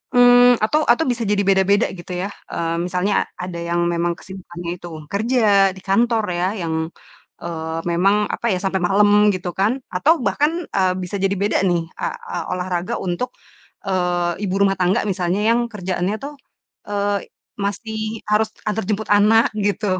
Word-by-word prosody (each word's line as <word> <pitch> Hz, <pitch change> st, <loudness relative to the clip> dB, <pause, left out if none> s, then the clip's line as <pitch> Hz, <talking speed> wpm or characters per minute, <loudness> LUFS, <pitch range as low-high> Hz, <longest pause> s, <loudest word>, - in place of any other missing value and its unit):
mmm, 245 Hz, 0 st, +7 dB
atau 300 Hz, +8 st, +2 dB
atau 240 Hz, +7 st, +4 dB
bisa 240 Hz, -1 st, -2 dB
jadi 205 Hz, 0 st, +2 dB
beda-beda 195 Hz, +2 st, +3 dB
gitu 180 Hz, 0 st, -10 dB
ya, -, -, -1 dB, 0.2 s
eee, 165 Hz, 0 st, -2 dB
misalnya 180 Hz, +3 st, 0 dB, 0.3 s
ada 180 Hz, -2 st, -5 dB
yang 170 Hz, 0 st, -1 dB
memang 170 Hz, 0 st, 0 dB
kesibukannya 175 Hz, -2 st, -9 dB
itu 175 Hz, -, -9 dB, 0.2 s
kerja 235 Hz, +5 st, +1 dB, 0.4 s
di 190 Hz, -, -12 dB
kantor 225 Hz, +3 st, +2 dB, 0.2 s
ya, 180 Hz, -, +1 dB
yang, 165 Hz, -1 st, -2 dB, 0.7 s
eee, 160 Hz, -1 st, -4 dB
memang 190 Hz, +4 st, +3 dB, 0.2 s
apa -, -, -7 dB
ya, 180 Hz, -, -1 dB
sampai 190 Hz, 0 st, 0 dB
malam 205 Hz, +2 st, +4 dB, 0.3 s
gitu 180 Hz, -1 st, -4 dB
kan, 200 Hz, +3 st, +3 dB, 0.2 s
atau 285 Hz, -, +4 dB
bahkan, 295 Hz, +5 st, +2 dB, 0.3 s
eee, 185 Hz, -1 st, +3 dB
bisa 180 Hz, -, -5 dB
jadi 195 Hz, +1 st, +2 dB
beda 200 Hz, +2 st, 0 dB
nih, 175 Hz, -1 st, +1 dB
eee -, -, -4 dB, 0.2 s
eee, 175 Hz, -, -3 dB
olahraga 180 Hz, +3 st, -2 dB
untuk, 180 Hz, +8 st, -2 dB, 0.6 s
eee, 180 Hz, -2 st, 0 dB
ibu 185 Hz, -, -2 dB
rumah 195 Hz, -1 st, +3 dB
tangga 185 Hz, +5 st, +2 dB
misalnya 180 Hz, +2 st, -1 dB
yang 235 Hz, -, +4 dB
kerjaannya 185 Hz, -1 st, -2 dB
tuh, 290 Hz, +1 st, -5 dB, 0.6 s
eee, 205 Hz, 0 st, -1 dB, 0.3 s
masih 205 Hz, +2 st, -3 dB, 0.3 s
harus 215 Hz, +1 st, +3 dB, 0.2 s
antar 220 Hz, +1 st, -1 dB
jemput 215 Hz, +1 st, -2 dB
anak 210 Hz, +3 st, +5 dB
gitu, 205 Hz, +1 st, 0 dB
195 Hz, 160 wpm, -20 LUFS, 180-215 Hz, 0.7 s, mmm